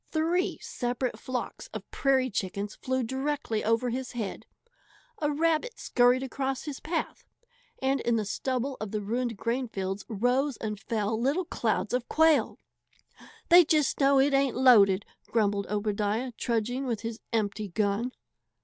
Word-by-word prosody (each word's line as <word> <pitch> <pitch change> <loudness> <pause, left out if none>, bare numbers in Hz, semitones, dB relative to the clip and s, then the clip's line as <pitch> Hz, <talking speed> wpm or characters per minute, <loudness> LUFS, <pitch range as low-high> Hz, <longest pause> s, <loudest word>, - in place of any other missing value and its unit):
Three 335 +3 +1
separate 245 0 -3
flocks 255 -1 -5
of - - -7
prairie 260 -2 +2
chickens 200 +1 -3
flew 260 0 -2
directly 265 -2 -2
over 230 +2 +1
his 255 +1 -4
head, 220 -5 -5 0.7
a 295 -1 +1
rabbit 330 +10 0
scurried 245 +1 +3
across 265 0 -3
his 295 -4 -6
path, 325 +1 -3 0.6
and 270 +1 +2
in 235 - +1
the 215 -2 0
stubble 260 +5 -2
of 215 - -3
the 215 +1 -2
ruined 235 +1 -2
grainfields 205 -5 -2
rose 245 +5 +1
and 210 -2 -4
fell 220 0 -1
little 290 +9 +1
clouds 225 -6 -1
of 250 -1 -1
quail. 320 -1 +3 0.9
"They 350 0 +9
just 305 -2 +1
know 275 -1 +5
it 275 +1 +3
ain't 275 -2 +2
loaded!" 210 -7 +6 0.2
grumbled 205 -3 +1
Obadiah, 210 +3 -1
trudging 240 +3 -2
with 230 -4 -2
his 230 0 -5
empty 215 -2 -1
gun. 205 +5 0
245 Hz, 145 wpm, -28 LUFS, 215-275 Hz, 0.9 s, They